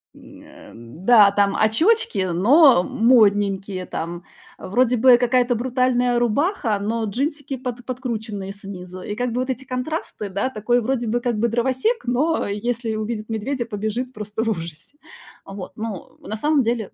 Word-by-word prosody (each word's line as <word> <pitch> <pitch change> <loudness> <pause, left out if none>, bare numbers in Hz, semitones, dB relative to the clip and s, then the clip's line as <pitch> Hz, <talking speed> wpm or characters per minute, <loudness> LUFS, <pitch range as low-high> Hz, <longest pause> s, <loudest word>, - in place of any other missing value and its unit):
М, - - -15
э, - - -17 0.3
м, 120 +11 -13
да, 215 -5 +7
там 200 0 +1
очёчки, 415 - +2
но 245 - +5
модненькие, 200 -5 +2
там 170 +2 -5 0.4
вроде 245 +5 +1
бы 245 +1 +7
какая-то 245 0 +2
брутальная 250 0 +1
рубаха, 240 - 0
но 225 +3 -2
джинсики 275 +5 -3
под 245 -1 -6
подкрученные 220 -6 -5
снизу. 185 -2 -9
И 205 - -5
как 245 0 -2
бы 245 - -2
вот 255 - -4
эти 260 +1 -4
контрасты, 255 - -4
да, 200 +7 -1
такой 240 +1 0
вроде 240 0 -1
бы 240 +2 0
как 240 -2 -2
бы 235 - +2
дровосек, 260 - 0
но 285 +7 0
если 225 +2 -2
увидит 215 0 -4
медведя, 235 +3 -2
побежит 225 +4 -4
просто 210 0 -4
в 225 - -1
ужасе, 165 - -6 0.5
вот. 195 -1 -8
Ну, 220 -5 -7
на 215 - -6
самом 295 +5 +2
деле 230 -4 -2
230 Hz, 160 wpm, -21 LUFS, 205-255 Hz, 0.5 s, да